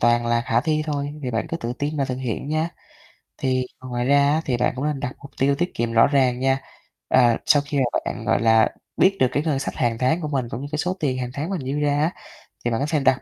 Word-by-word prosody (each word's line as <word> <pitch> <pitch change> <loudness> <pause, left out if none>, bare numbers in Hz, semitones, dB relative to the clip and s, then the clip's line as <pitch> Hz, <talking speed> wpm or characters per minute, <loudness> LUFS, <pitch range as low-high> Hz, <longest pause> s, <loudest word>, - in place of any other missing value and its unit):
toàn 120 0 +3
là 120 0 +2
khả 120 0 +1
thi 155 +2 0
thôi, 145 -1 -2
thì 125 - -2
bạn 115 - -1
cứ 165 - -2
tự 120 -5 -4
tin 150 +2 -2
và 140 - +1
thực 130 -1 -3
hiện 130 +2 -4
nha. 155 +2 0 0.7
Thì 130 -1 0 0.2
ngoài 125 -1 -2
ra 140 +1 +4
á, 160 - +1
thì 125 -3 0
bạn 125 - +1
cũng 135 +3 -3
nên 150 -2 -1
đặt 130 - -3
mục 140 -1 -12
tiêu 140 +1 +3
tiết 175 +4 -2
kiệm 115 0 -1
rõ 115 - +6
ràng 130 -3 +2
nha. 135 +1 +1 0.5
Ờ, 120 -3 +4
sau 145 - +5
khi 145 0 -3
mà 135 - +3 0.2
bạn, - - -4
gọi - - +2
là, 110 -1 +5 0.3
biết 195 +1 +4
được 130 - +5
cái 145 - 0
ngân 150 -4 0
sách - - -4
hàng 115 -2 0
tháng 145 +8 +1
của 155 - -2
mình 135 -5 -2
cũng 120 - -5
như 145 - -5
cái 150 - -1
số 180 +4 -1
tiền 130 -5 0
hàng 125 -1 -3
tháng 150 +5 -3
mình 190 -5 -2
dư 135 +3 -2
ra 145 0 +1
á, 160 - +2 0.5
thì 120 - +1
bạn 115 - 0
có 140 - 0
thể 155 -2 +2
đặt 135 -1 +2
135 Hz, 280 wpm, -23 LUFS, 125-150 Hz, 0.7 s, rõ